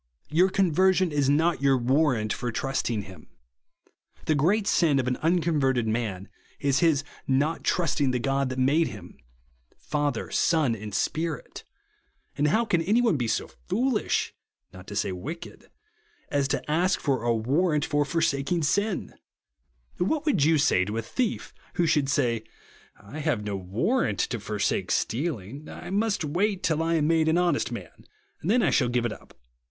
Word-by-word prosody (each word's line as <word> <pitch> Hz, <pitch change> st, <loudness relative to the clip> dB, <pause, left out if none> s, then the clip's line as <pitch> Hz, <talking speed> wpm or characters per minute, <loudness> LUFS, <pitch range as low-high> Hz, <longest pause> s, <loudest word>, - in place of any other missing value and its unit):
Your 180 Hz, +5 st, +4 dB
con 190 Hz, -2 st, +1 dB
version 185 Hz, +1 st, +3 dB
is 145 Hz, -2 st, +1 dB
not 160 Hz, +2 st, +2 dB
your 135 Hz, -1 st, +4 dB
warrant 125 Hz, -3 st, +1 dB
for 120 Hz, -, -3 dB
trusting 115 Hz, -3 st, -2 dB
him. 95 Hz, -5 st, -13 dB, 1.0 s
The 155 Hz, -, +2 dB
great 185 Hz, +9 st, +2 dB
sin 165 Hz, -8 st, +3 dB
of 130 Hz, -2 st, 0 dB
an 125 Hz, -, 0 dB
unconverted 155 Hz, -8 st, +1 dB
man 110 Hz, -4 st, -2 dB, 0.3 s
is 140 Hz, -1 st, +1 dB
his 155 Hz, -3 st, +3 dB, 0.2 s
not 145 Hz, +5 st, +1 dB
trusting 150 Hz, -5 st, +1 dB
the 125 Hz, -, 0 dB
God 135 Hz, +1 st, 0 dB
that 130 Hz, -, -5 dB
made 145 Hz, +6 st, +3 dB
him; 95 Hz, -4 st, -10 dB, 0.6 s
Father, 145 Hz, -5 st, -2 dB
Son, 150 Hz, -8 st, +2 dB
and 105 Hz, -1 st, -7 dB
Spirit; 160 Hz, -, -3 dB, 0.7 s
and 145 Hz, -, +1 dB
how 220 Hz, +10 st, +2 dB
can 175 Hz, -6 st, +1 dB
any 205 Hz, +8 st, +2 dB
one 230 Hz, -7 st, +3 dB
be 120 Hz, -4 st, -1 dB
so -, -, -1 dB, 0.2 s
foolish, 235 Hz, +4 st, 0 dB, 0.4 s
not 90 Hz, 0 st, -12 dB
to 105 Hz, -, -7 dB
say 100 Hz, -, 0 dB
vnched, 145 Hz, -, -8 dB, 0.6 s
as 140 Hz, -1 st, +1 dB
to -, -, -2 dB
ask 175 Hz, +5 st, +1 dB
for 135 Hz, -5 st, 0 dB
a 120 Hz, 0 st, +1 dB
warrant 150 Hz, +7 st, +1 dB
for 145 Hz, 0 st, +1 dB
forsaking 160 Hz, +2 st, 0 dB
sin 200 Hz, +6 st, 0 dB, 0.8 s
1 180 Hz, -, 0 dB
What 315 Hz, -1 st, -1 dB
would 240 Hz, -, +2 dB
you 160 Hz, +1 st, +4 dB
say 95 Hz, -10 st, +3 dB
to 105 Hz, +4 st, -4 dB
a 115 Hz, -, -2 dB
thief 240 Hz, -, -3 dB, 0.2 s
who 175 Hz, -, +2 dB
should 150 Hz, -4 st, +2 dB
say, 120 Hz, -5 st, +1 dB, 0.6 s
I 120 Hz, +10 st, -9 dB
have 145 Hz, -9 st, -1 dB
no 105 Hz, -1 st, -3 dB
tvarrant 115 Hz, -, 0 dB
to 120 Hz, -, -2 dB
forsake 105 Hz, 0 st, -1 dB
stealing; 135 Hz, -, -2 dB
I 175 Hz, -, -8 dB
must 205 Hz, -3 st, 0 dB
wait 190 Hz, +6 st, 0 dB
till 160 Hz, -1 st, +1 dB
I 165 Hz, +1 st, +1 dB
am 155 Hz, -2 st, +2 dB
made 160 Hz, 0 st, +2 dB
an 160 Hz, -, +3 dB
honest 180 Hz, -1 st, +1 dB
man, -, -, -9 dB, 0.3 s
then 215 Hz, +9 st, +2 dB
I -, -, +3 dB
shall 125 Hz, -4 st, +2 dB
give 120 Hz, 0 st, 0 dB
it 115 Hz, -, -1 dB
up -, -, -16 dB
145 Hz, 170 wpm, -26 LUFS, 120-170 Hz, 1.0 s, Your